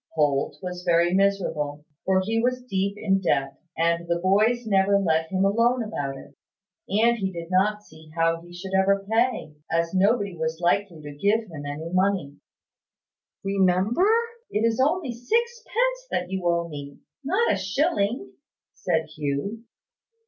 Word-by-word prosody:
Holt 145 -3 +1
was 180 -1 -5
very 170 0 +3
miserable, 160 -7 0 0.2
for 190 0 +3
he 225 +4 0
was 250 +1 0
deep 200 -4 -1
in 195 -2 +1
debt, 135 -6 0 0.2
and 170 +1 +1
the 170 0 +1
boys 215 +7 +2
never 200 -1 +3
let 160 -4 +1
him 190 0 +2
alone 230 +4 +2
about 140 -11 -4
it; - - -13 0.6
and 230 +4 +3
he 190 -1 -1
did 170 0 -7
not 210 +3 +2
see 160 -4 -16
how 165 0 +1
he 175 +1 -15
should 190 +2 -8
ever 195 +1 +2
pay, 225 -7 0 0.2
as 165 +1 0
nobody 200 0 +2
was 160 0 -3
likely 175 -2 0
to 145 - -7
give 205 +8 +2
him 155 -8 -8
any 155 +4 -5
money. 185 -6 +1 1.1
"Remember, 195 - +2 0.4
it 215 +2 0
is 230 0 +1
only 305 -2 0
sixpence 470 - -1
that 180 +1 -2
you 190 -2 -2
owe 170 0 +1
me 145 -3 -8 0.3
not 380 +12 +2
a - - +1
shilling," 225 - 0 0.4
said 160 -3 -1
Hugh. 155 +10 -3
190 Hz, 155 wpm, -25 LUFS, 165-220 Hz, 1.1 s, very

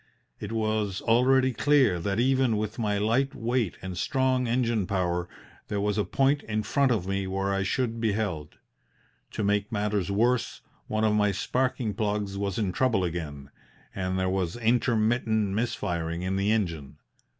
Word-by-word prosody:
It 105 - -6
was 110 -3 -1
already 130 +3 +3
clear 130 -7 +3
that 100 +5 -1
even 130 -2 +2
with 110 +2 -3
my 105 -2 0
light 120 +7 +1
weight 115 -4 -1
and 95 -1 -5
strong 130 +7 +1
engine 115 -4 0
power 90 -2 -1 0.4
there 105 - -2
was 105 0 0
a - - +2
point 140 +5 +1
in 110 -1 -2
front 135 +4 +2
of 105 -7 0
me 95 0 -2
where 95 +1 -1
I 95 - 0
should 115 +3 -1
be 110 -3 +1
held. 90 -9 -3 0.8
To 110 - -2
make 100 0 0
matters 105 -3 -1
worse, 115 +5 +1 0.3
one 110 0 -1
of 110 -1 +3
my 105 -1 +3
sparking 125 +2 -1
plugs 105 -1 -2
was 100 -1 -2
in 105 -5 0
trouble 110 -2 +1
again 75 -5 -5 0.4
and 95 -1 -2
there 95 0 0
was 95 -2 -1
intermittent 115 -3 +1
missfiring 85 -6 -2
in 95 +1 -1
the 100 +2 +1
engine. 85 -10 -2
105 Hz, 165 wpm, -27 LUFS, 95-120 Hz, 0.8 s, already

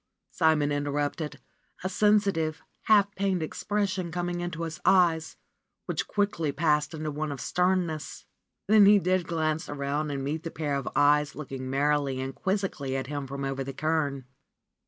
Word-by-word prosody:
Simon 160 -3 +2
interrupted, 145 +1 -2 0.4
a - - 0
sensi 205 +1 +3
tive, 160 -2 -3 0.2
half 205 -2 +4
pained 195 -4 0
expression 190 +1 -2
coming 175 +1 -2
into 175 -1 -4
his 160 -1 -5
eyes, 170 -4 +3 0.5
which - - -2
quickly 200 -7 0
passed 150 0 +1
into 155 -1 -3
one 150 +1 -3
of 140 - -5
sternness. 180 -4 -1 0.4
Then 210 -1 +6
he 205 0 +8
did 185 -2 +1
glance 160 -1 -1
around 145 +1 -2
and 140 -2 -3
met 150 +3 -2
the 165 - -5
pair 155 -3 -3
of 140 -2 -2
eyes 145 0 +3
looking 135 -3 -6
merrily 140 -1 +1
and 135 +1 -4
quizzically 190 -9 -2
at 130 - -3
him 145 0 -4
from 140 +1 -4
over 135 0 -2
the 135 +1 -6
cairn. 145 -2 -1
155 Hz, 160 wpm, -28 LUFS, 145-180 Hz, 0.5 s, he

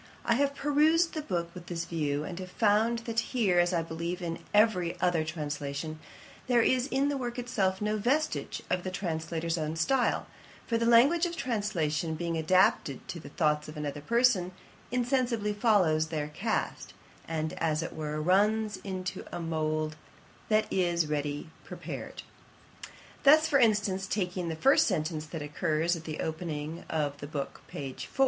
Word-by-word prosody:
I - - +3
have 280 +3 +1
perused 310 +4 +3
the 310 - -2
book 170 - -3
with 175 -2 -10
this 170 -1 -3
view, 150 -3 -1
and 175 +2 -6
have 185 -1 -6
found 220 +4 +2
that 230 -1 0
here, 220 -7 +1
as 175 +1 +3
I 170 -2 +1
believe 170 +2 -4
in 165 -2 -4
every 205 -5 +3
other 175 -3 +2
translation, 150 0 -4 0.5
there 240 -2 +4
is 255 +2 +2
in 275 +1 +1
the 285 - -1
work 245 -2 -4
itself 205 -6 0
no 210 +1 0
vestige 285 +9 0
of 180 - 0
the 185 - -2
translator's 165 -2 -2
own 155 0 -2
style; 245 +10 +1 0.4
for 230 -1 0
the 230 - +1
language 280 +10 +5
of 340 -1 -6
translation 175 - -1
being 170 +1 -2
adapted 160 -4 +2
to 170 - -5
the - - -10
thoughts 150 0 +1
of 155 0 -9
another 145 -1 -4
person, 230 - +2 0.4
insensibly 245 -4 0
follows 185 -8 +3
their 150 -2 -3
cast, 195 +9 -3 0.3
and, 160 -1 -2
as 155 -1 +1
it - - -5
were, 155 -1 -3
runs 210 +6 +2
into 185 -1 -5
a - - -4
mould 155 -1 -1 0.5
that 215 0 +3
is 175 -3 +2
ready 145 +1 -3
prepared. - - -7 1.0
Thus, 310 +3 +7
for 285 -4 +3
instance, 205 -5 +2
taking 180 -4 -2
the 160 - -2
first 270 - +4
sentence 155 -4 -1
that 155 -1 -5
occurs 155 +3 0
at 165 -1 -9
the 155 - -4
opening 160 -1 -4
of 145 -3 -1
the 145 - -6
book, 140 -2 -5
p. 135 -2 -6
4. - - -7
175 Hz, 170 wpm, -29 LUFS, 155-230 Hz, 1.0 s, Thus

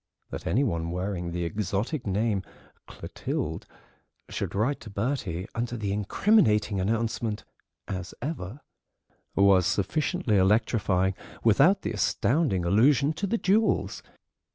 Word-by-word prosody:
That - - -6
any 130 +7 +2
one 85 -9 -1
wearing 90 0 -3
the 85 0 -3
exotic 105 - -2
name 100 +1 0 0.5
"Clotilde" - - -5 0.6
should - - -4
write 120 +8 0
to 110 - -10
Bertie 100 -5 -2
under 120 +1 -3
the 100 -3 -2
incriminating 105 - +2
announcement 110 +1 -1 0.4
"as 95 -2 -5
ever" 130 - -5 0.7
was 100 -2 +5
sufficiently 120 - 0
electrifying, 95 -1 +2 0.3
without 145 - +4
the - - -2
astounding 115 - +1
allusion 135 - +4
to 195 +6 -3
the 230 - 0
jewels. 215 +2 +1
105 Hz, 115 wpm, -27 LUFS, 95-135 Hz, 0.7 s, was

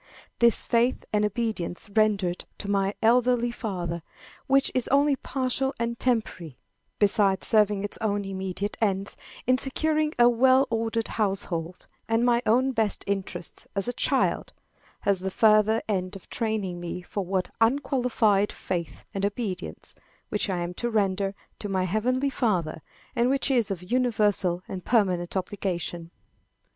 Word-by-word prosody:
This 235 -1 +4
faith 240 +2 +1
and 210 0 +3
obedience 210 -4 -2
rendered 205 -5 +2
to 200 - -6
my 200 0 +1
earthly 240 +1 +3
father, 175 -8 -4 0.5
which 275 0 +3
is 255 - +1
only 280 +1 +4
partial 265 +1 -1
and 235 0 -2
temporary, 185 - -1 0.4
besides 200 -2 +2
serving 210 -2 +3
its 205 - -5
own 205 -2 0
immediate 190 +1 -3
ends, 195 -2 0 0.3
in 255 +1 +3
securing 310 +2 0
a 240 0 +7
well 260 +3 +5
ordered 225 0 -1
household 185 -5 -2 0.2
and 225 +1 +2
my 240 -1 +3
own 255 +5 +3
best 220 -4 0
interests 190 -3 -4
as 195 +2 0
a 245 - -1
child, - - 0 0.5
has 200 -2 +2
the 190 +1 -2
further 215 +2 +4
end 190 -2 -1
of 195 - -11
training 210 -6 -2
me 175 +1 -5
for 200 +3 -3
that 185 - -3
unqualified 230 -5 +2
faith 175 -3 -5
and 195 - -3
obedience, 200 - -4 0.4
which 210 0 -1
I 180 -2 -1
am 175 +1 -3
to 240 - 0
render 200 -2 0 0.2
to 205 - -4
my 190 -1 +1
heavenly 250 +9 0
Father, 180 -12 0 0.3
and 240 0 +3
which 275 +1 +1
is 240 -5 +3
of 180 +1 -5
universal 210 -8 +2
and 185 -2 -6
permanent 185 -6 +1
obligation. 180 -3 -3
210 Hz, 145 wpm, -26 LUFS, 190-240 Hz, 0.5 s, a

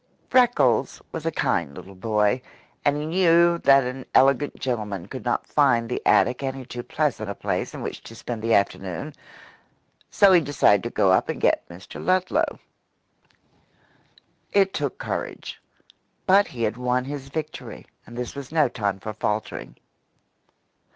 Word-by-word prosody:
Freckles 250 -1 +3
was 165 0 -5
a - - +1
kind 70 - -1
little 95 - -11
boy, 105 +4 +1 0.4
and 145 0 +2
he 150 - -3
knew 170 0 +4
that 140 -2 +5
an 130 +1 -5
elegant 135 +2 +3
gentleman 105 -8 -3
could - - -7
not - - -1
find 115 -1 +2
the 125 - -3
attic 125 +2 +3
any 135 -1 -4
too 120 0 -6
pleasant 135 -6 -2
a 100 - -4
place - - -3
in - - -6
which - - -5
to 115 - -12
spend 115 0 -6
the 115 +1 +2
afternoon, 95 -3 -1 1.1
go 200 -1 +8
he 175 - +6
decided 140 -9 +3
to 120 - -4
go 95 -5 +2
up 95 - +2
and - - -3
get - - +1
Mr. 85 +2 -10
Ludlow. 185 0 +1 1.9
It 195 -1 +3
took 145 -3 -2
courage; - - -5 0.6
but 200 +2 +5
he 120 -3 -5
had 110 +1 -1
won 125 0 0
his 135 -1 -6
victory 155 +2 -6 0.2
and 120 - -11
this 125 -1 -4
was 140 -1 -8
no 155 -3 +3
time 100 -4 -2
for 110 +2 -6
faltering. 105 0 -3
125 Hz, 155 wpm, -24 LUFS, 110-155 Hz, 1.9 s, go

